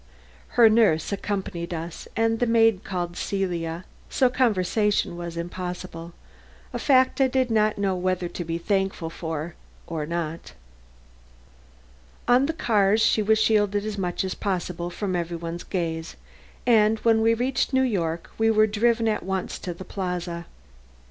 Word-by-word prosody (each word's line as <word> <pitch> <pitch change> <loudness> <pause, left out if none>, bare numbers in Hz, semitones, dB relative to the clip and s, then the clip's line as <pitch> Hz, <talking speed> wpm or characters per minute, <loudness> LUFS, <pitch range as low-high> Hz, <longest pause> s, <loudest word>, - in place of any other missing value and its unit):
Her 235 -2 +9
nurse 215 -8 +3
accompanied 190 -4 -3
us 165 +1 -7
and 225 0 +1
the 245 - +1
maid 225 -3 +4
called 175 -2 -3
Celia, 175 -3 -2 0.2
so 255 -2 +2
conversation 210 -5 +1
was 170 -1 -6
impossible 175 -1 -6 0.6
a - - -3
fact 260 -1 +3
I 265 - +5
did 255 -1 0
not 215 -1 +2
know 195 -2 0
whether 180 -1 -1
to 175 - -5
be 165 0 -3
thankful 190 -2 -1
for 160 0 -5 0.3
or 155 -3 -4
not. 165 -1 -4 1.7
On 250 +3 +4
the 325 - -1
cars 215 -7 +2
she 215 - +3
was 220 +1 +3
shielded 205 -2 +2
as 210 -2 -4
much 180 -1 -1
as 190 - -2
possible 180 -3 -3
from 185 +1 -3
every 170 -1 -2
one's 170 +1 -5
gaze, 165 -3 -3 0.5
and 220 -2 +4
when 225 -1 +4
we 225 +1 +4
reached 255 +3 0
New 260 0 +3
York 170 -9 -2
we 225 0 +4
were 215 -1 +5
driven 225 +2 +1
at 215 - 0
once 190 -1 -3
to 180 - -5
the 175 +2 -9
Plaza. 180 -3 -4
195 Hz, 155 wpm, -25 LUFS, 170-220 Hz, 1.7 s, Her